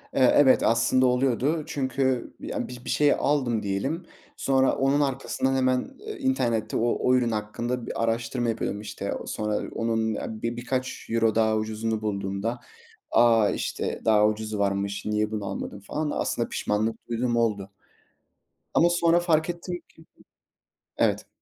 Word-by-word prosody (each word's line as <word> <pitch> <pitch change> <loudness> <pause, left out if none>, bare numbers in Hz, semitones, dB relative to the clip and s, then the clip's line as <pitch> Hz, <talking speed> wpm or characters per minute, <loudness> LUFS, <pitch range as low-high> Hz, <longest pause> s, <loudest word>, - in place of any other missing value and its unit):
Eee, 130 -2 +5
evet, 135 -3 +6
aslında 120 +3 +3
oluyordu. 130 +5 +1
Çünkü 130 -3 -1
bi - - -8
ya, - - -3
bi 125 - -8
bir - - -5
şeyi 145 -1 +4
aldım 130 -6 0
diyelim. 100 - -2 0.3
Sonra 135 -1 +2
onun 135 +2 +2
arkasından 135 -1 0
hemen, 130 - 0
eee, 425 -2 -7
internette 120 - 0
o 120 +1 +2
o 125 - +3
ürün 120 -2 +2
hakkında 115 +3 -3
bir 115 - -3
araştırma 115 +1 -1
yapıyorum 105 -2 -2
işte. 105 - -4
Sonra 105 -1 -2
onun 115 -1 0
a 110 0 -5
bi 115 0 -2
birkaç 125 +1 -3
euro 115 -1 +2
daha 110 -1 +3
ucuzunu 110 0 -2
bulduğumda 100 +2 -2 0.5
"A, 115 -2 +5
işte - - -3
daha 105 -1 +5
ucuzu 110 0 -3
varmış, 100 0 -1
niye 105 0 0
bunu 105 -2 -3
almadın?" 95 +1 -5
falan 150 +9 -3
da - - -3
aslında - - -1
pişmanlık 110 +2 -2
duyduğum 120 0 0
oldu 105 -4 0 1.0
ama 170 - +5
sonra 170 0 +3
fark 165 -1 +1
ettim 175 +1 -4
ki 160 - -19 0.9
evet. - - +1
115 Hz, 155 wpm, -26 LUFS, 110-135 Hz, 1.0 s, evet